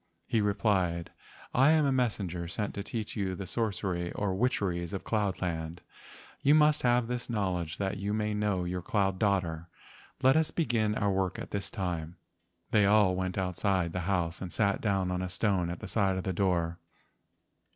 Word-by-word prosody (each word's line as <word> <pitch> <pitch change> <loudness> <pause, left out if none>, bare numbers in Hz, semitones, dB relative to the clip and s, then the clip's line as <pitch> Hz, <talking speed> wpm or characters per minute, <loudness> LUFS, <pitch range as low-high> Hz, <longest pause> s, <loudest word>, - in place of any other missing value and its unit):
He 115 - +1
replied: 95 -5 +1 0.4
"I 135 +4 +5
am 155 -1 +4
a 140 - +2
messenger 100 -9 -1
sent 105 +4 -3
to 100 - -4
teach 110 +1 -5
you 95 -4 -1
the 95 - -6
sorcery 95 -4 -2
or 100 -2 -1
witcheries 95 -5 0
of 95 - -4
cloud 105 -4 -1
land. 80 -1 -3 0.6
You 145 +2 +5
must 150 -1 +4
have 120 -1 +3
this 125 +1 -4
knowledge 90 -7 -1
that 100 0 -2
you 100 +1 -2
may 105 0 0
know 105 -3 0
your 90 +1 -3
cloud 95 0 0
daughter. 90 -6 0 0.6
Let 130 +1 +6
us 160 -1 +3
begin 115 -9 0
our 100 -1 +1
work 95 -1 0
at - - -7
this 100 -1 -3
time." 90 -5 -3 0.6
They 105 -2 +5
all 100 -3 +5
went 95 0 -2
outside 90 -2 0
the 90 - -1
house 90 -2 0
and 90 -2 -5
sat 100 -2 +1
down 95 -4 +1
on 90 0 -1
a 90 - -3
stone 90 -2 +1
at 85 - -5
the - - -6
side 95 -3 +1
of 95 - -3
the 95 - -2
door. 85 -3 0
95 Hz, 185 wpm, -30 LUFS, 90-105 Hz, 0.6 s, Let